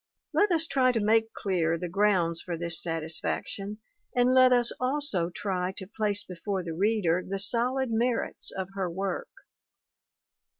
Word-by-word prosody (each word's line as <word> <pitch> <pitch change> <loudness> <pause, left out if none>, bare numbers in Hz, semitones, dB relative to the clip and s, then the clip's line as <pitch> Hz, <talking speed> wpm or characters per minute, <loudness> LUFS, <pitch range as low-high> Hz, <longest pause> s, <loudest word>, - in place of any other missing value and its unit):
Let 410 -1 +3
us 330 -1 +3
try 260 -5 +2
to 230 - +1
make 220 +1 +2
clear 170 -5 0
the 180 - -4
grounds 180 -3 +2
for 175 -2 -4
this 170 -1 +1
satisfaction 165 +5 -2 0.4
and 250 +1 +4
let 255 0 +6
us 240 -1 +4
also 255 - 0
try 185 0 -3
to 190 - -6
place 205 0 -1
before 185 +1 -4
the 165 -1 -5
reader 185 -2 +1
the 195 +1 -4
solid 240 +5 +1
merits 235 +1 0
of 190 -1 -5
her 190 -2 -2
work. 190 +2 -3
200 Hz, 155 wpm, -28 LUFS, 175-235 Hz, 0.4 s, let